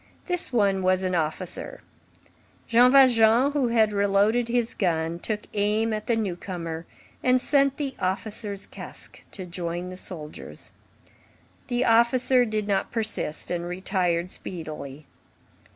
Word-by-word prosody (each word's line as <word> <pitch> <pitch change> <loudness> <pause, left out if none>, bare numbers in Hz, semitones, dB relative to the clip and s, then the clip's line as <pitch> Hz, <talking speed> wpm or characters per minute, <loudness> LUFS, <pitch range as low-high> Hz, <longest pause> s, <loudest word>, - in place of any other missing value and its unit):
This 355 -5 -2
one 200 -5 +2
was 185 0 +2
an 185 -1 -1
officer. 175 - -3 0.9
Jean 245 +2 +6
Valjean, 250 -1 +6
who 285 -4 +1
had 225 -2 +3
re 200 0 +2
loaded 210 +4 +2
his 235 -1 0
gun, 165 -2 -1
took 210 +3 0
aim 215 +2 +1
at 215 0 -4
the 235 - +2
newcomer 175 -5 -4 0.3
and 255 0 +4
sent 275 0 +2
the 280 -3 -3
officer's 200 +2 -3
casque - - -11
to 185 - -6
join 175 0 -4
the 185 - -8
soldier's. 155 -5 -9 1.0
The 245 0 0
officer 245 +2 +4
did 215 -2 -2
not 195 -2 0
persist, 220 -9 -2
and 175 -1 -2
retired 180 -1 -1
speedily. 155 -4 -7
205 Hz, 135 wpm, -25 LUFS, 180-235 Hz, 1.0 s, Jean